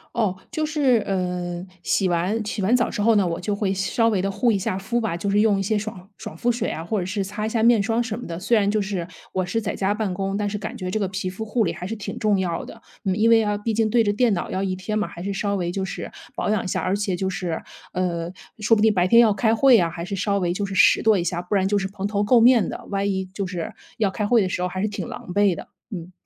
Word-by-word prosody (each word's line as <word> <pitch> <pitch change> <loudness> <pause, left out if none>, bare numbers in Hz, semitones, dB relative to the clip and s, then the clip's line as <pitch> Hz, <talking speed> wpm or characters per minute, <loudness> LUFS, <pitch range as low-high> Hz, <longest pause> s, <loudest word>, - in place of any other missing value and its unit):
哦， 215 -5 +1 0.2
就 310 -1 -1
是， 275 -7 +2
呃， 180 -2 -2 0.2
洗 190 -3 +1
完 185 +6 0
洗 210 -1 -3
完 215 +6 +3
澡 245 - +2
之 205 - -3
后 225 +1 +4
呢， 200 - +4
我 165 -1 -2
就 200 +3 -2
会 200 -2 0
稍 225 +4 +1
微 195 -4 +1
地 195 - -1
护 230 +4 +2
一 200 - +1
下 185 0 -2
肤 235 +5 -1
吧， 220 -7 -1
就 200 +4 -2
是 205 +1 +3
用 210 -2 +4
一 195 - -1
些 210 +2 +1
爽 200 -2 -6
爽 160 - -8
肤 240 +5 +1
水 235 0 -2
啊， 160 - -4
或 200 +4 -1
者 180 - -2
是 195 +1 -2
擦 205 +2 -4
一 - - -1
下 220 -1 0
面 230 -3 +5
霜 225 +3 +1
什 230 -1 -4
么 245 - -7
的。 165 -1 -5
虽 225 +6 +2
然 200 -1 +2
就 210 0 +1
是 190 -4 -3 0.2
我 185 -1 -1
是 225 +5 -1
在 210 - -2
家 195 +1 0
办 210 -3 -2
公， 195 +1 -2
但 205 0 -1
是 210 - -3
感 210 +1 -6
觉 185 0 -4
这 215 - 0
个 195 - 0
皮 190 0 -3
肤 210 +4 -6
护 225 +2 +1
理 170 - 0
还 180 +1 -6
是 225 - -4
挺 210 - -6
重 210 -2 +2
要 175 -3 -2
的。 - - -12 0.2
嗯， 190 -1 +1
因 220 +2 +3
为 230 -1 +7
要 210 -1 0
毕 225 +1 -2
竟 220 0 +2
对 235 +1 +4
着 205 - +2
电 225 0 +2
脑 175 - -3
要 190 - -1
一 190 -1 -1
天 210 +4 -2
嘛， - - -1
还 170 - -9
是 200 0 -2
稍 200 +1 -1
微 175 -2 -1
就 190 +1 -2
是 190 - -6 0.2
保 - - -1
养 215 -2 +2
一 - - -5
下， - - -1
而 185 - 0
且 200 -2 0
就 190 +1 -1
是， 175 -3 -3 0.3
呃， 170 -2 -1 0.3
说 220 +2 +4
不 210 - +1
定 220 -1 +5
白 180 -1 +2
天 235 +5 +7
要 215 -3 +5
开 220 +3 +2
会 260 0 +6
啊， 170 -2 +1
还 170 0 -6
是 185 +3 -6
稍 200 0 +1
微 175 -2 0
就 200 +3 -2
是 195 - -5
拾 190 - +6
掇 220 -1 +4
一 175 - +1
下， 175 -1 -2
不 180 +3 -2
然 190 -1 +2
就 205 - +2
是 195 -1 -1
蓬 195 0 -6
头 205 0 -1
垢 230 +4 +4
面 240 -2 +6
的， - - -6
万 200 0 0
一 190 -1 -1
就 195 -1 -3
是 180 -3 -4 0.3
要 205 -4 +1
开 210 +1 -2
会 235 -1 +4
的 185 - 0
时 180 - -2
候 180 - +1
还 185 +1 -4
是 210 - 0
挺 200 -5 -5
狼 - - -8
狈 205 -3 +3
的， - - -9 0.2
嗯。 180 -3 -7
200 Hz, 330 characters per minute, -23 LUFS, 185-215 Hz, 0.3 s, 为